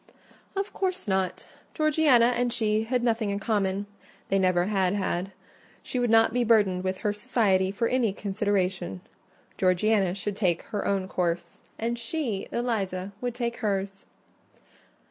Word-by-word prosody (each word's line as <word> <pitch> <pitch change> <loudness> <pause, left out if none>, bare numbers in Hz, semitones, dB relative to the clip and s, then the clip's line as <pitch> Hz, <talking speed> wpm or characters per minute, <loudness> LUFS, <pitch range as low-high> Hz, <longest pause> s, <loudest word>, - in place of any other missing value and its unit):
"Of 390 +1 -2
course 375 - -2
not. 190 -2 -1 0.3
Georgiana 295 -6 +4
and 245 0 0
she 220 -1 +1
had 245 +1 0
nothing 225 -3 +1
in 200 - -1
common: 200 -1 0 0.4
they 195 - +2
never 185 -2 +3
had 195 -2 +1
had. 190 -1 -2 0.5
She 250 - -3
would 245 -1 +1
not 225 0 +5
be 245 0 +2
burdened 205 -5 +3
with 190 0 -1
her 205 - +2
society 210 -4 +1
for 230 +4 -1
any 245 -4 +1
consideration. 190 - -1 0.6
Georgiana 190 0 +2
should 200 +1 -3
take 180 -5 +1
her 205 -3 -3
own 195 -1 0
course; 170 -2 -2 0.2
and 235 +1 -2
she, 230 -5 -3
Eliza, 200 -6 -2
would 245 -1 -2
take 235 -1 -2
hers." 195 -3 -2
205 Hz, 145 wpm, -27 LUFS, 190-235 Hz, 0.6 s, not